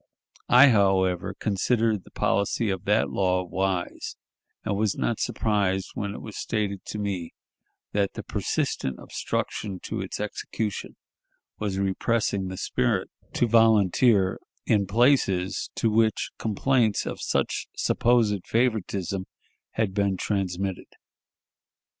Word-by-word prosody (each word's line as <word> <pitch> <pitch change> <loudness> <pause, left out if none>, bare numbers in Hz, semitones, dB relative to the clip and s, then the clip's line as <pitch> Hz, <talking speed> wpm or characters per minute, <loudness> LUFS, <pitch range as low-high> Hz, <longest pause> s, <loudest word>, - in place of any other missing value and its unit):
I, 130 +3 +8
however, 95 -5 +2
considered 110 0 +1
the - - -15
policy 100 +2 0
of 95 0 -4
that 105 +2 +2
law 90 -1 +1
wise, 95 0 -2 0.5
and - - 0
was 105 -1 0
not 115 - -1
surprised 100 -3 0
when 100 0 -4
it - - -8
was 110 - -7
stated 100 -3 -2
to - - -5
me 100 -5 -3 0.6
that 100 -1 0
the - - -6
persistent 65 -1 -2
obstruction 100 -4 -3
to - - -3
its - - -5
execution 105 -4 -4 0.6
was 100 -3 -2
repressing 100 0 0
the 95 0 -6
spirit 110 -1 0 0.2
to - - +2
volunteer 110 -2 +4 0.3
in 100 -2 +2
places 100 -5 +2
to 115 - +1
which 110 0 +2
complaints 110 0 +1
of - - -5
such - - -1
supposed 115 -6 +2
favoritism 100 -5 0 0.5
had 110 -4 0
been 100 -2 +1
transmitted. 95 -1 -2
100 Hz, 120 wpm, -26 LUFS, 95-110 Hz, 0.6 s, I